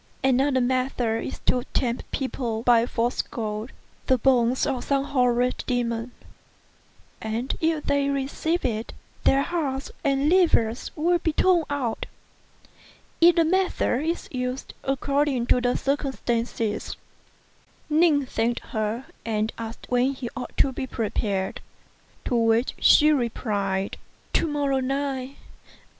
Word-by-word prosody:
Another 265 0 +3
method 245 -3 0
is - - -6
to 250 - +2
tempt 240 -2 -1
people 240 -4 -3
by 240 -1 +4
false 240 +1 0
gold, 215 0 -5 0.4
the 260 - +4
bones 250 0 +3
of 265 -4 -2
some 275 -1 +1
horrid 250 -2 +1
demon; 235 -2 -1 1.1
and 225 +4 -2
if 320 -2 +1
they 280 0 +1
receive 280 +5 -1
it, 225 -1 -2 0.3
their 275 +1 +4
hearts 280 -6 -2
and 275 +1 +2
livers 305 -10 +3
will 345 +3 +2
be 320 -2 -1
torn 350 -1 +3
out. 260 -6 -2 1.1
Either 335 0 +6
method 360 -6 +1
is 335 +2 -2
used 250 0 -4
according 275 -1 0
to 245 0 +2
circumstances." 240 -6 -2 0.9
Ning 305 -2 +3
thanked 235 -1 -1
her, 220 +4 -2 0.2
and 220 -1 -1
asked 225 0 -7
when 250 +2 +2
he 245 -3 -6
ought 255 - -7
to 275 - +3
be 260 - -4
prepared; 205 -5 -2 0.6
to - - -2
which 230 +1 +2
she 305 0 +6
replied, 205 -7 -1 0.4
"To - - +2
morrow 285 -3 0
night." 270 0 -2
255 Hz, 120 wpm, -25 LUFS, 235-280 Hz, 1.1 s, Either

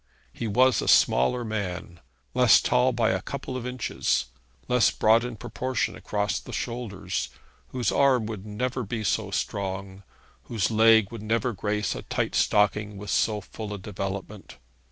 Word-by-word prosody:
He 115 - -4
was 125 +4 +3
a - - -4
smaller 115 - +4
man, 95 -5 -4 0.3
less - - +6
tall 60 - +2
by - - +1
a - - -1
couple 130 - -6
of 125 -1 -4
inches, 125 -1 -1 0.4
less 125 -4 +4
broad 110 +2 +3
in 125 -1 -5
proportion 130 +3 -2
across 100 -2 -2
the - - -11
shoulders, 100 -6 -4 0.4
whose 125 -5 -1
arm 130 -5 +3
would 105 -3 -6
never 125 +5 -3
be 110 0 -4
so 100 - 0
strong, 95 -1 -3 0.4
whose 115 -3 -1
leg 110 -2 +5
would 115 -3 -7
never 115 +2 0
grace 105 +1 -1
a - - -6
tight - - -2
stocking 105 0 +2
with 105 +1 -6
so 105 -2 +1
full 105 +1 -7
a - - -6
development. 100 +1 -6
105 Hz, 155 wpm, -26 LUFS, 100-120 Hz, 0.4 s, less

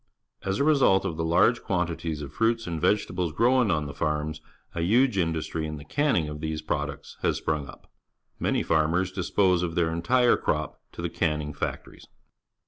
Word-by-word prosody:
As 95 0 -1
a - - +1
result 135 -11 +4
of 85 -4 -2
the 80 - -2
large 85 +9 +3
quantities 85 -5 -2
of 70 0 -8
fruits 115 +4 +1
and 85 -3 -4
vegetables 90 -2 +1
grown 125 +1 +3
on 80 -4 +1
the 70 - -6
farms, 75 0 -2 0.3
a 85 - -3
huge 120 +7 +3
industry 80 -2 -1
in 75 0 -5
the 70 - -11
canning 135 - +1
of 75 0 -6
these 80 -1 -3
products 75 -1 -4
has - - +1
sprung 75 -3 -2
up. - - -13 0.5
Many - - +1
farmers 85 +4 +1
dispose 95 -1 +2
of 85 -2 -2
their 85 -2 +1
entire 120 +9 +3
crop - - -2
to - - -7
the - - -1
canning 75 -1 -1
factories. 70 - -6
85 Hz, 180 wpm, -26 LUFS, 75-100 Hz, 0.5 s, result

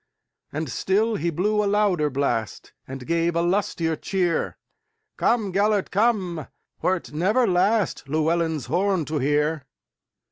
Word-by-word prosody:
And 155 +2 -3
still 210 - +1
he 170 -2 -1
blew 210 +6 +1
a - - 0
louder 200 -7 +2
blast, 130 -6 -2
And 130 -1 -7
gave 170 +2 0
a 170 - +2
lustier 175 -3 0
cheer:"Come, 225 - -2
Gêlert, 205 0 +1
come, 190 - 0 0.3
wert 185 -1 -1
never 210 +11 +2
lastLlewelyn's 170 - +1
horn 185 -1 +1
to 150 0 -2
hear. 150 +2 +1
175 Hz, 115 wpm, -24 LUFS, 155-205 Hz, 0.3 s, louder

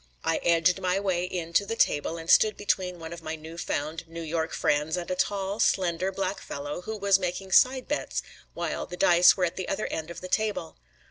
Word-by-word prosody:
I 165 - +1
edged 170 +2 +2
my 185 +1 +1
way 185 -3 0
in 175 -2 -5
to 200 - +4
the 225 +3 -4
table 160 -4 +1
and 165 0 -8
stood 215 +4 +5
between 185 -3 -1
one 165 0 -8
of 170 - -9
my 160 0 -4
new 160 +1 -10
found 160 0 -3
New 165 0 -7
York 160 +1 -2
friends 150 +3 0
and 175 0 -4
a - - 0
tall, 195 +2 -1
slender, 185 -1 +1
black 195 +1 -2
fellow, 145 +4 -5
who 220 +4 -5
was 200 -1 +3
making 185 +1 -4
side 255 +3 +4
bets 295 - -2 0.3
while - - -3
the 180 - -8
dice 175 +2 +6
were 185 - +2
at 170 - -4
the 185 - -4
other 215 - -1
end 160 0 -4
of 170 - -7
the 185 - -6
table. 210 -5 -1
180 Hz, 220 wpm, -27 LUFS, 165-195 Hz, 0.3 s, dice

